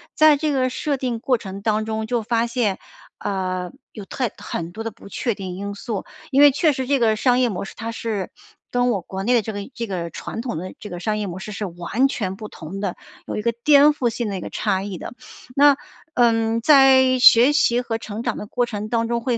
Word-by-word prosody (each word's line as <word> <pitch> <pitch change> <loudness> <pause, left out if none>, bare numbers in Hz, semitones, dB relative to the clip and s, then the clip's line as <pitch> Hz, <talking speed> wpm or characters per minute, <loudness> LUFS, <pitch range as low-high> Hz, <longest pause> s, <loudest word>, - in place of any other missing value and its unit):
在 310 -2 +6
这 305 +1 -1
个 260 -2 +1
设 285 +2 -2
定 250 -3 -2
过 250 +1 +1
程 195 -1 -8
当 215 0 0
中 220 0 -3
就 235 -2 -1
发 230 +1 +1
现， 230 -5 0 0.4
呃， 185 -2 -3 0.2
有 210 - -8
太 245 +3 -2
很 170 +1 -5
多 225 - -6
的 225 - -4
不 215 -1 -15
确 235 +3 -2
定 190 -2 -6
因 200 +2 -5
素。 205 -1 -4 0.3
因 275 0 +3
为 290 -1 +9
确 290 +2 +2
实 260 0 -3
这 280 -1 +2
个 220 -2 +3
商 250 +2 +2
业 255 - +3
模 200 -6 -3
式， 195 - -9
它 230 +1 -5
是 215 -5 -3 0.4
跟 245 0 +1
我 215 -5 +1
国 190 +3 -6
内 245 - +2
的 240 - +4
这 220 0 -6
个 205 - -4
这 230 -1 -4
个 175 -3 -3
传 225 - -6
统 235 -7 -4
的 185 +3 -6
这 210 - -9
个 175 - -6
商 210 +4 -1
业 210 - -2
模 185 -1 -6
式 210 +2 -7
是 205 - -4
完 185 +10 0
全 195 -8 -3
不 210 +2 -8
同 185 +5 -8
的， 195 -3 -3 0.3
有 - - -4
一 - - -1
个 235 +2 0
颠 290 -1 +7
覆 245 -5 0
性 230 0 -3
的 195 -2 -3
一 - - -6
个 - - -6
差 190 0 -1
异 200 -2 -5
的。 - - -8 0.4
那， 285 0 +6 0.4
呃， 225 -1 +2
在 265 -1 +6
学 245 +3 +7
习 245 -4 +3
和 230 -2 -3
成 220 0 -6
长 245 - -2
的 - - -6
过 245 +3 0
程 215 -1 -5
当 230 0 0
中 235 0 -1
会 240 -1 0
225 Hz, 265 characters per minute, -22 LUFS, 200-250 Hz, 0.4 s, 为